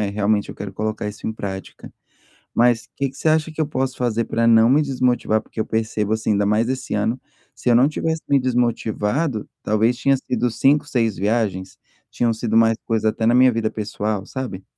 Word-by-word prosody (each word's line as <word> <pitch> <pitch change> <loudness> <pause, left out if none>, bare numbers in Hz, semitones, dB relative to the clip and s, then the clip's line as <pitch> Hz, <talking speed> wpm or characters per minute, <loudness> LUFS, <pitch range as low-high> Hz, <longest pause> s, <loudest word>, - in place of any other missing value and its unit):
é, 105 - 0
realmente 105 0 0
eu - - -9
quero 100 -1 -7
colocar 110 +1 -3
isso 105 - -8
em 110 - -1
prática. 95 -3 -7 0.6
Mas 120 0 +3
o - - -25
que 140 -2 -1
que 135 - -18
você 160 - 0
acha 155 +1 +2
que 155 - -6
eu 155 - +2
posso 130 -2 -2
fazer 115 -2 0
para 115 +1 0
não 115 0 +6
me 140 +4 +4
desmotivar, 125 -5 +1
porque 110 - -8
eu - - +1
percebo, 110 -1 -1
assim, 110 0 -1
ainda 100 0 +1
mais 110 +3 +2
esse 130 -2 -3
ano, 110 +4 -1 0.3
se - - -4
eu 120 - +5
não 125 +4 +5
tivesse 160 +1 -2
me 140 - +4
desmotivado, 120 +1 -1
talvez 110 +3 +1
tinham 135 +2 +2
sido 125 -2 -1
5, 145 +6 +2
6 115 -7 0
viagens? 100 -2 -1 0.3
Tinham 120 -1 0
sido 110 0 -2
mais 115 0 +4
coisas 115 -2 -1
até 110 - -2
na 120 - +4
minha 130 0 +6
vida 110 -1 -1
pessoal, 105 -1 -3
sabe? 120 -9 -6
115 Hz, 210 wpm, -21 LUFS, 110-130 Hz, 0.6 s, não